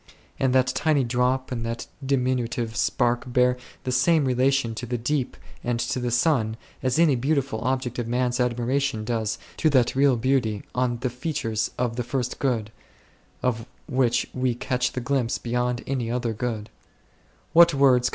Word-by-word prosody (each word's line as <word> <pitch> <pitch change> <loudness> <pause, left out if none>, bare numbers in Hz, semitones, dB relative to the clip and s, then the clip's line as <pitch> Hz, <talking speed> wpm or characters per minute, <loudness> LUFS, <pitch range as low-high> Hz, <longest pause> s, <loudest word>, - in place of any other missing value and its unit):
And 135 -1 +2
that 130 -1 +5
tiny 145 +2 +1
drop 125 +2 0
and 120 -2 -3
that 115 0 -4 0.2
diminutive 125 -3 0
spark 120 +1 0
bear 125 0 +3 0.3
the 130 - -2
same 140 +4 +3
relation 130 -1 +2
to 120 +2 -6
the 120 +1 -1
Deep 130 +2 -1 0.3
and 120 -1 -1
to 125 - -1
the 125 -1 -1
Sun, 120 -3 +1 0.2
as 130 +1 0
any 160 -4 +5
beautiful 135 -2 0
object 130 -1 -1
of 120 - -2
man's 125 +1 0
admiration 125 0 0
does 110 -2 -1 0.2
to 155 - +3
that 130 -5 +3
real 135 -2 +4
beauty 115 -4 0
on 125 -1 0
the 130 - -1
features 125 -5 -2
of 120 -1 -1
the 125 - 0
First 125 0 -3
Good, 115 -6 -1 0.7
of 115 -2 -1 0.2
which 125 -2 +2
we 130 -2 0
catch 125 0 -1
the 125 - -3
glimpse 125 -2 0
beyond 125 0 -1
any 130 -4 -2
other 120 -1 -1
good. 110 -1 -4
125 Hz, 160 wpm, -25 LUFS, 120-130 Hz, 0.7 s, that